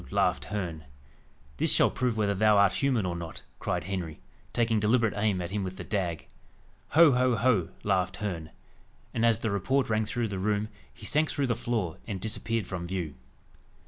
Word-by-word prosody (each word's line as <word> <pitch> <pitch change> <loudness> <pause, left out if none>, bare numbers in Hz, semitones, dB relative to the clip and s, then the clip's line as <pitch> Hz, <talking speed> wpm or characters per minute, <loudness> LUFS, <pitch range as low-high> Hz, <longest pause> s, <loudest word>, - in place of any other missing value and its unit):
laughed - - +1
Herne. 85 -7 -4 0.7
"This - - +3
shall - - +4
prove 125 -3 -1
whether 105 -2 +2
thou 105 +1 +4
art 100 -2 +5
human 125 -6 +1
or 90 -1 -2
not," 85 -2 -6 0.2
cried - - -1
Henry, 90 -3 -4 0.3
taking 115 -2 +2
deliberate 110 +1 +3
aim 100 -2 +1
at 85 - -5
him 105 0 -1
with 95 0 -5
the - - -6
dag. 90 -6 -2 0.7
"Ho! 165 -3 +9
ho! 125 -1 +3
ho!" 105 -7 +2
laughed 95 -2 +1
Herne. 85 -7 -4 0.6
And 115 - 0
as 115 -2 +4
the 110 -1 -2
report 115 +5 +1
rang 110 0 +2
through 115 +1 -2
the 95 -2 -3
room, 105 +2 0 0.2
he - - -10
sank 155 +1 +2
through 140 - 0
the 120 -3 +1
floor, 115 -8 -2
and 100 -4 -3
disappeared 110 +1 -2
from 90 -2 -5
view. 85 -5 -3
105 Hz, 185 wpm, -28 LUFS, 95-115 Hz, 0.7 s, Ho